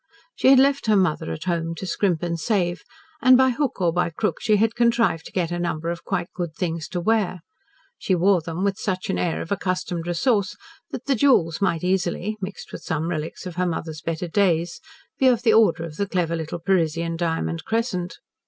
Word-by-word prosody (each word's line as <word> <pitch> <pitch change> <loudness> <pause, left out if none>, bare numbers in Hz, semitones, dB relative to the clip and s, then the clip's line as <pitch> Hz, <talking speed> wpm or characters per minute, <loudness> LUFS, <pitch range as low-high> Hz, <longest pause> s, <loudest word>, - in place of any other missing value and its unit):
She - - 0
had 270 0 +8
left 275 -1 +3
her 215 - +4
mother 175 - +1
at 80 - -5
home 165 -2 -2
to 190 - -6
scrimp 180 -2 0
and 170 -1 -2
save, 180 -3 0 0.4
and 255 -1 +7
by 260 0 +4
hook 270 -1 -2
or 175 -3 +2
by 180 0 +1
crook 210 +6 -2
she 215 -3 +3
had 225 +2 +2
contrived 235 -8 +2
to - - -13
get 175 -3 -1
a 175 - -2
number 170 -1 -2
of 170 - -6
quite 180 -3 -3
good 175 -5 -4
things 165 -3 -3
to 180 - -3
wear. 190 -2 0 0.6
She 185 - +1
wore 180 +1 +3
them 165 +3 -4
with 200 -1 0
such 185 -1 -2
an - - -1
air 170 -2 -1
of 165 - -12
accustomed 185 -3 -2
resource 190 +3 +1 0.3
that 255 - -7
the 280 - +2
jewels 210 - +3
might 170 -4 +1
easily 185 +2 0
mixed 190 +1 -7
with - - -7
some 160 0 -2
relics 155 +1 -5
of 180 -1 -7
her 180 0 +1
mother's 160 -2 -4
better 165 +2 -3
days 170 -2 +1 0.4
be 265 - +5
of 240 -2 +3
the 225 -3 +4
order 205 -7 +4
of 160 -2 -8
the 200 - -1
clever 170 -2 0
little 160 0 -4
Parisian 170 -2 0
diamond 165 -1 -2
crescent. 220 -6 -2
180 Hz, 210 wpm, -23 LUFS, 165-210 Hz, 0.6 s, had